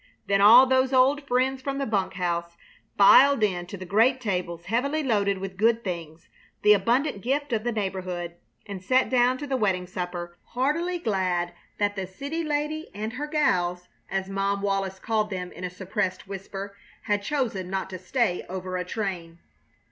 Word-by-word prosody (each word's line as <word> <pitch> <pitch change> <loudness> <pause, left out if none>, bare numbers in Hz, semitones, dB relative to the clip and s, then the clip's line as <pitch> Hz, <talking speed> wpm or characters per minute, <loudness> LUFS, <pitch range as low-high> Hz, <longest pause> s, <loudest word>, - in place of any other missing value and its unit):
Then 200 0 +2
all 235 +6 +9
those 260 0 +2
old 275 +3 +3
friends 260 +1 +1
from 275 +1 -3
the 275 - -1
bunk 200 -5 -1
house 170 -2 -2 0.4
filed 260 +5 +7
in 180 -4 0
to 200 - -7
the 185 - -8
great 225 +8 +3
tables 180 -7 -3
heavily 280 - 0
loaded 200 -6 +1
with 190 0 -6
good 230 +2 +2
things, 170 -3 -6 0.4
the 210 - +8
abundant 235 +4 +1
gift 275 +3 -1
of 215 -1 0
the 240 - 0
neighborhood, 185 -5 -3 0.3
and 195 -3 -7
sat 255 +7 +2
down 250 0 +3
to 290 - -6
the 270 -2 -1
wedding 190 -5 0
supper, 175 -1 -6
heartily 315 +8 -1
glad 185 - -1 0.2
that 205 0 0
the 190 -2 -4
"city 280 - -4
lady 305 +1 -2
and 215 +2 -4
her 290 +4 -4
gals" 180 - 0 0.2
as 195 0 -2
Mom 195 +1 -1
Wallis 195 -1 -1
called 215 +1 -1
them 180 -3 -5
in - - -10
a 180 - -2
suppressed 190 +1 -3
whisper 195 +1 -7 0.3
had 205 -1 0
chosen 215 -7 -2
not 190 0 -2
to 185 - -6
stay 195 -1 0
over 185 0 -4
a 180 - -2
train. 180 -4 -4
200 Hz, 180 wpm, -26 LUFS, 185-255 Hz, 0.4 s, all